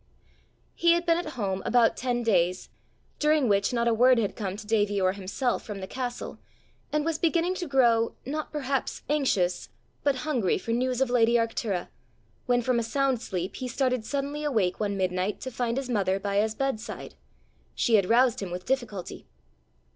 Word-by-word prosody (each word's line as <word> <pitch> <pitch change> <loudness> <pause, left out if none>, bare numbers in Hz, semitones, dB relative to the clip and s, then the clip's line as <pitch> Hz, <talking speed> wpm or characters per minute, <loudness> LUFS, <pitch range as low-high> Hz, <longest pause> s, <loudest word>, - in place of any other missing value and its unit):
He 340 0 +4
had 345 0 0
been 335 0 +3
at 310 -3 -5
home 195 -3 -1
about 240 -1 +3
ten 245 -1 -1
days, 185 -5 +1 0.5
during 300 -3 +3
which 200 -2 +2
not 235 -1 0
a 235 - +3
word 250 +2 +5
had 215 -4 0
come 195 -3 -4
to 215 - -9
Davie 205 -2 +1
or 185 -1 +3
himself 200 +6 -2
from 205 -2 -6
the 190 - -5
castle, 245 +4 -5 0.5
and 300 0 0
was 325 -1 -1
beginning 340 +2 +1
to 350 - -3
grow, 235 -4 +3
not 300 +4 -4
perhaps 275 -3 -2
anxious, 205 -12 +1 0.3
but 285 -2 +2
hungry 250 - +1
for 230 - -5
news 250 +2 0
of 265 -2 +1
lady 235 -1 +4
Arctura, 225 -5 0 0.6
when 245 -1 +2
from 250 0 +2
a - - -1
sound 265 +1 0
sleep 185 -4 -4
he 255 - -4
started 255 -1 0
suddenly 285 +4 -3
awake 215 -11 0
one 200 -2 -1
midnight 185 +2 -1
to 260 - -5
find 240 0 -2
his 270 -1 -2
mother 195 -5 0
by 200 0 -2
his 215 +1 +1
bedside: 260 -4 -4 0.6
she 235 - +1
had 200 -4 +4
roused 245 +1 +4
him 195 - -4
with 180 +1 -6
difficulty. 235 -9 -3
235 Hz, 185 wpm, -27 LUFS, 200-265 Hz, 0.6 s, word